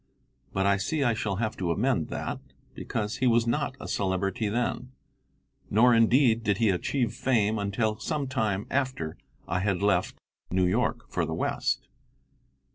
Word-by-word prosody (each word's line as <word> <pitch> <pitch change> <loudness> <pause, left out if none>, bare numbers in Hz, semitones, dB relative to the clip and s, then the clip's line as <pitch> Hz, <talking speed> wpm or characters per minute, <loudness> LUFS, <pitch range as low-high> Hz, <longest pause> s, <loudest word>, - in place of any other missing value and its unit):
But 95 0 0
I 100 0 +4
see 140 +10 -1
I 120 -3 +3
shall 105 -3 -2
have 110 +2 -2
to 90 -3 -2
amend 85 - +1
that, - - -4 0.3
because 105 0 -3
he 130 - +2
was 115 -1 +4
not 130 +3 -1
a - - -7
celebrity 100 +2 -1
then, 125 +3 -2 0.8
nor, 120 +4 +5
indeed, 115 +1 +4
did 105 -3 +1
he 115 -1 +3
achieve 115 +5 -1
fame 110 -4 +1
until 105 +2 -1
some 150 -3 -2
time 110 -7 -1
after 130 - -1 0.3
I 90 - 0
had 100 -1 0
left 95 -3 +2 0.3
New 90 0 +2
York 120 +5 0
for 85 - 0
the 80 0 -2
West. - - -1
110 Hz, 160 wpm, -27 LUFS, 100-120 Hz, 0.8 s, nor